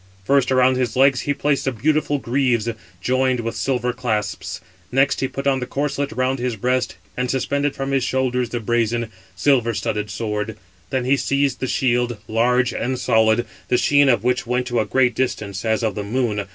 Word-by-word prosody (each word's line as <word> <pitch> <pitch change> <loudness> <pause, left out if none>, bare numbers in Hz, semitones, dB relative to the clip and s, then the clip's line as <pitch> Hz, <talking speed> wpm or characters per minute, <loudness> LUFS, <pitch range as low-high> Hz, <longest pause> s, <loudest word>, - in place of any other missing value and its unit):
First 135 +4 +2
around 130 0 +4
his 125 -3 -1
legs 135 0 +4
he - - +4
placed 145 0 0
the 135 - +1
beautiful 145 +5 +1
greaves, 125 -3 0 0.3
joined 130 +1 +1
with 115 0 -4
silver 125 -2 -1
clasps, 110 -4 -3 0.3
next 135 +2 +2
he 135 - 0
put 135 +1 -6
on 135 -1 +2
the 125 - -4
corslet 140 +1 -2
round 130 +2 0
his 125 -1 -1
breast, 125 +4 0 0.2
and 125 0 -2
suspended 140 +2 0
from 135 0 -3
his 135 -2 +1
shoulders 125 -1 0
the 120 - -3
brazen, 115 0 0 0.2
silver 120 +2 +2
studded 105 0 -2
sword; 105 0 -3 0.3
then 130 -2 -1
he 135 +2 +3
seized 140 +2 0
the 130 - -2
shield, 120 -2 +1
large 120 +2 +2
and 130 +2 -2
solid, 110 -1 +3 0.2
the 125 - +2
sheen 145 +2 +4
of 120 -4 +2
which 125 -1 0
went 125 +1 0
to 120 -2 -1
a 110 - +1
great 125 +2 +2
distance, 105 -6 -2
as 110 0 0
of 110 -2 0
the 105 - -4
moon. 105 -2 -1
125 Hz, 190 wpm, -21 LUFS, 115-135 Hz, 0.3 s, around